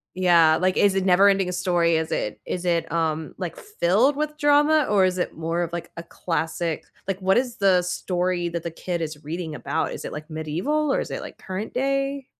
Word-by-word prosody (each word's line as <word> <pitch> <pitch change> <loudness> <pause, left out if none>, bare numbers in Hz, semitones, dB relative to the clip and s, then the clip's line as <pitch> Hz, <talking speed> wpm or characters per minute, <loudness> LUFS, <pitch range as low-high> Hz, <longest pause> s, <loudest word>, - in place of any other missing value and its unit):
yeah, 170 -4 +5
like, 185 0 +1
is 200 -1 +4
it 190 0 0
NeverEnding 195 0 +4
Story? 175 -2 +2
Is 160 0 -3
it 105 - -3
is 180 0 -4
it, 170 -1 0
um, 160 -2 -1
like, 180 -3 -5
filled 265 - +1
with 300 0 -2
drama, 295 0 +4
or 195 -2 +4
is 185 0 0
it - - -2
more 165 +2 -1
of, 170 -1 -2
like, 170 0 -5
a - - -4
classic 165 -1 -3 0.2
like, 195 0 -2
what 190 +3 +3
is 245 -2 0
the 190 -3 +4
story 180 0 -1
that 170 -1 -4
the 170 - -4
kid 175 +1 -4
is 155 -2 -5
reading 160 0 -5
about? 160 +2 -2
Is - - -7
it, - - -5
like, 155 +2 -8
medieval, 180 - -1
or - - +1
is - - -4
it, - - -4
like, - - -9
current 190 +3 -6
day? 275 +1 -1
180 Hz, 215 wpm, -24 LUFS, 165-200 Hz, 0.2 s, yeah